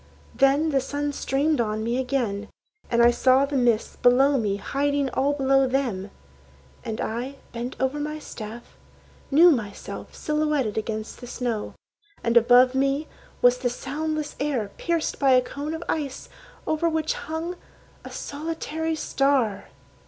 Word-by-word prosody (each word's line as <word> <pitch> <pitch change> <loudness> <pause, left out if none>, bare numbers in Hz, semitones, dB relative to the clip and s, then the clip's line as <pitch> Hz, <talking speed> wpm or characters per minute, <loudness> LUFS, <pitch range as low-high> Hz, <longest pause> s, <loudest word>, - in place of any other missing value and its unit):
Then 280 +3 +3
the 270 -2 +2
sun 290 +2 -3
streamed 285 +1 +1
on 215 -1 -2
me 235 +3 0
again, 240 -6 -1 0.4
And 235 0 +3
I 240 - +7
saw 260 +3 +4
the 280 0 -4
mists 240 -4 +1
below 265 +3 +4
me 205 -3 0
hiding 280 +5 -1
all 280 +3 +1
below 270 -1 +3
them. 245 -8 -1 0.7
And 225 -1 -4
I, 250 +4 -3 0.2
bent 240 +2 -5
over 265 +3 0
my 300 +1 -3
staff, 230 -5 -9 0.5
knew 335 +5 +7
myself 215 -8 -4
Silhouetted 300 -7 0
against 220 +1 -4
the 245 - -8
snow. 240 -3 -3 0.5
And 235 0 +1
above 245 +2 +6
me 275 +3 +1 0.4
Was 245 0 +5
the 250 -1 0
soundless 300 +4 -3
air, 255 -8 -1
pierced 335 -2 -1
by 270 -2 +5
a 255 - +6
cone 290 +5 -5
of 320 - -6
ice, 285 -4 -3 0.4
Over 315 +2 +1
which 315 -1 0
hung 325 +3 -4 0.5
a - - -8
solitary 320 +1 -4
star! 275 -8 +1
270 Hz, 145 wpm, -25 LUFS, 240-295 Hz, 0.7 s, I